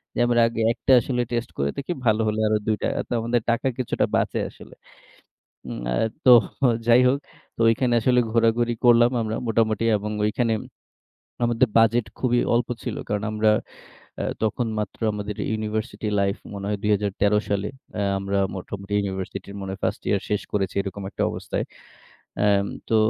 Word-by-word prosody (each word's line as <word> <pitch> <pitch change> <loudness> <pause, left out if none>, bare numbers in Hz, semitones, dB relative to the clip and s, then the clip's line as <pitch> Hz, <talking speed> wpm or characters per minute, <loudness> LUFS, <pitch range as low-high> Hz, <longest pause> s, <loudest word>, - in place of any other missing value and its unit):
যে - - -2
আমরা 120 0 +3
আগে 115 -1 -3
১ 120 - -5
টা - - +5
আসলে 125 +1 -1
টেস্ট 120 0 -2
করে 70 0 0
দেখি 140 +5 -4
ভালো 110 0 +3
হলে 110 0 0
আরো 110 - +2
২ 110 - +3
টা। - - +1 0.2
তো - - -2
আমাদের 120 +1 +1
টাকা 115 +3 +1
কিছুটা 130 -3 0
বাঁচে - - 0
আসলে। - - -14 0.9
হুম, - - -6 0.5
তো 130 - +7 0.6
যাই 120 +1 +7
হোক, 135 +2 +3 0.4
তো - - -20
ঐখানে 120 +2 +1
আসলে 125 +2 +3
ঘোরাঘুরি 115 +1 +2
করলাম 120 0 +6
আমরা 110 0 -2
মোটামুটি 110 -1 +1
এবং 105 +1 -5
ওইখানে 115 +1 +1 0.9
আমাদের 120 +1 +2
বাজেট 115 0 +3
খুবই 120 -1 +2
অল্প 120 0 +1
ছিল। 120 - -4
কারণ 105 0 -1
আমরা 110 0 +3 0.7
আ - - -1 0.2
তখন 115 +2 0
মাত্র 105 - -4
আমাদের 105 0 -5
ইউনিভার্সিটি 110 0 -3
লাইফ 100 0 +1 0.2
মনে 100 -1 -6
হয় 105 - 0
২০১৩ 105 0 +2
সালে 100 0 -1 0.5
আমরা 100 0 -1 0.2
মোটামুটি 100 +2 -6
ইউনিভার্সিটির 95 0 -4
মনে 95 - -5
হয় 95 - -8
ফার্স্ট - - -1
ইয়ার 100 - +1
শেষ 105 - 0
করেছি 95 -2 -1
এরকম 100 0 -5
একটা - - -3
অবস্থায়। - - -3 0.7
অ্যাম 100 -1 +3 0.2
তো 115 - +3
110 Hz, 165 wpm, -24 LUFS, 100-120 Hz, 0.9 s, তো